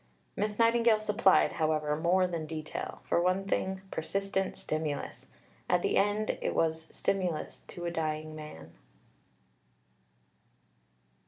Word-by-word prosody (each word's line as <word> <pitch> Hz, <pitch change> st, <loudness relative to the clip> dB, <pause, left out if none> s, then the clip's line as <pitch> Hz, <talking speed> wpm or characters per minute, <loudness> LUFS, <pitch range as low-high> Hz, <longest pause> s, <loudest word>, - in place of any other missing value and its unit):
Miss 210 Hz, 0 st, -1 dB
Nightingale 230 Hz, -1 st, +4 dB
supplied, 210 Hz, -2 st, +4 dB
however, 155 Hz, -2 st, +1 dB
more 175 Hz, +4 st, +3 dB
than 170 Hz, -3 st, -3 dB
detail 155 Hz, -1 st, -5 dB
for 170 Hz, -, +1 dB
one 185 Hz, +2 st, +1 dB
thing, 190 Hz, -1 st, -1 dB
persistent 195 Hz, +4 st, -1 dB
stimulus. 155 Hz, -2 st, -3 dB, 0.4 s
At -, -, +3 dB
the -, -, +1 dB
end 205 Hz, +2 st, +1 dB
it -, -, -1 dB
was 160 Hz, 0 st, 0 dB
stimulus 180 Hz, -5 st, -2 dB
to 175 Hz, -, -7 dB
a 170 Hz, -, -1 dB
dying 155 Hz, -1 st, -2 dB
man. 85 Hz, -, -9 dB
170 Hz, 115 wpm, -31 LUFS, 155-195 Hz, 0.4 s, Nightingale